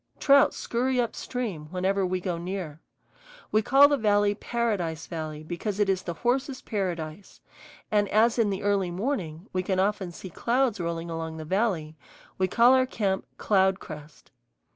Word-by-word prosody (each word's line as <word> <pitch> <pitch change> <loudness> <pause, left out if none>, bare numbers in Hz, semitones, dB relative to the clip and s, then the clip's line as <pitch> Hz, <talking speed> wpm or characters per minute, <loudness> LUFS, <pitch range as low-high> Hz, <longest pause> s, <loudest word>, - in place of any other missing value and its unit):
Trout 280 -1 +6
scurry 250 +2 -1
up 235 -2 0
stream 210 -12 -4
whenever 190 +2 0
we 185 0 0
go 175 -2 -3
near. 175 -4 -5 0.7
We 215 - +4
call 275 +5 +6
the 285 0 +1
valley 205 -3 +3
Paradise 205 -8 -2
Valley 155 -2 -6
because 185 +5 -4
it 205 -1 +2
is 190 -1 +1
the 170 -2 -5
horses' 260 - -1
paradise. 180 -4 -4 0.5
And 205 -2 +2
as 225 +3 +3
in 220 -3 +3
the 195 -1 -3
early 200 -3 +1
morning 180 - -3
we 185 - +1
can 185 0 -1
often 195 -2 0
see 180 +2 -9
clouds 240 +2 +1
rolling 170 0 -3
along 160 -1 -4
the 155 - -7
valley, 170 -5 -1 0.4
we 185 - +3
call 235 +6 +5
our 260 0 +4
camp 195 -6 -1
Cloudcrest. 185 -6 -1
195 Hz, 165 wpm, -27 LUFS, 170-230 Hz, 0.7 s, Trout